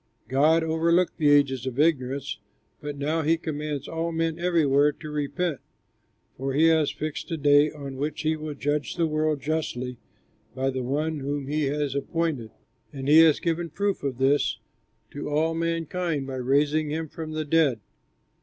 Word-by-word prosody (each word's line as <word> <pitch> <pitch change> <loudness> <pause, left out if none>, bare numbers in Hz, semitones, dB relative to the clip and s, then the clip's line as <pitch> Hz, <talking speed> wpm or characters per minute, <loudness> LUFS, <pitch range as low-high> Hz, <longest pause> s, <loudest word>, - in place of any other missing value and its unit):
God 155 +5 +4
overlooked 165 +2 +1
the 150 -2 +3
ages 135 -3 +3
of 130 +1 -4
ignorance, 140 -3 0 0.4
but 145 -1 -6
now 155 +4 0
he 160 +2 +2
commands 150 -3 -4
all 165 +1 -2
men 165 0 -1
everywhere 150 -5 +3
to 155 - -9
repent, 150 +1 -2 0.8
for 135 +1 -3
he 160 +4 +5
has 160 -2 +3
fixed 155 +3 -5
a 165 - -2
day 145 0 +5
on 140 -3 -8
which 150 +2 -3
he 160 +1 +1
will 155 -1 -6
judge 145 -2 -2
the 170 -2 +1
world 155 -2 0
justly 130 -5 -3 0.6
by 135 +1 0
the 130 0 -3
one 150 +5 -1
whom 140 0 -3
he 150 +2 -1
has 145 0 -1
appointed, 140 -4 -2 0.4
and 135 -2 -6
he 155 +2 +7
has 160 -2 +6
given 170 0 -1
proof 200 +5 -1
of 135 -3 -3
this 135 -1 +2 0.5
to 145 - -5
all 155 +2 +1
mankind 165 -2 -2
by 135 - -6
raising 145 +4 +1
him 160 +2 -3
from 155 +1 -7
the 155 0 -2
dead." 145 -6 +2
150 Hz, 170 wpm, -26 LUFS, 140-160 Hz, 0.8 s, he